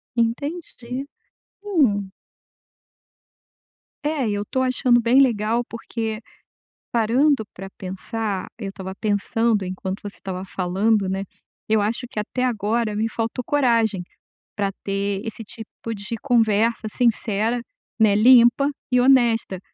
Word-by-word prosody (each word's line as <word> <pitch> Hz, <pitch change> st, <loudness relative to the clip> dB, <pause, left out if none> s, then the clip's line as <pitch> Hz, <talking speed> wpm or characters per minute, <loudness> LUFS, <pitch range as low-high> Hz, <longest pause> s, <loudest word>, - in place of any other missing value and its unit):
Entendi, 250 Hz, +1 st, -2 dB, 0.6 s
hum. 255 Hz, -, +1 dB, 1.9 s
É, 295 Hz, -4 st, 0 dB
e -, -, 0 dB
eu 205 Hz, 0 st, -2 dB
tô 260 Hz, -, -1 dB
achando 255 Hz, -1 st, +3 dB
bem 240 Hz, +3 st, +4 dB
legal, 230 Hz, -2 st, +2 dB
porque 225 Hz, -1 st, -4 dB, 0.7 s
parando 240 Hz, +3 st, +3 dB
pra 195 Hz, +1 st, -8 dB
pensar 195 Hz, +1 st, -4 dB
eu 205 Hz, -4 st, -5 dB
estava 190 Hz, -1 st, -7 dB
pensando 215 Hz, +1 st, 0 dB
enquanto 185 Hz, +1 st, -4 dB
você 205 Hz, -1 st, -7 dB
estava 185 Hz, -1 st, -5 dB
falando, 195 Hz, +3 st, +1 dB
né. 190 Hz, +1 st, -2 dB, 0.5 s
Eu 220 Hz, -1 st, +4 dB
acho 215 Hz, +4 st, -1 dB
que 215 Hz, -, -4 dB
até 250 Hz, +4 st, -2 dB
agora 225 Hz, -2 st, 0 dB
me 220 Hz, +2 st, 0 dB
faltou 230 Hz, +3 st, -3 dB
coragem, 230 Hz, -9 st, +2 dB, 0.5 s
pra 200 Hz, -2 st, 0 dB
ter 195 Hz, 0 st, -1 dB
esse 225 Hz, 0 st, -6 dB
tipo 225 Hz, +1 st, -8 dB
de 205 Hz, +3 st, -4 dB
conversa 225 Hz, -3 st, +2 dB
sincera, 225 Hz, -1 st, +1 dB, 0.4 s
né, 215 Hz, -2 st, +5 dB
limpa 240 Hz, +4 st, +6 dB, 0.2 s
e 250 Hz, -, +4 dB
honesta, 240 Hz, -7 st, +3 dB
225 Hz, 120 wpm, -23 LUFS, 205-245 Hz, 1.9 s, limpa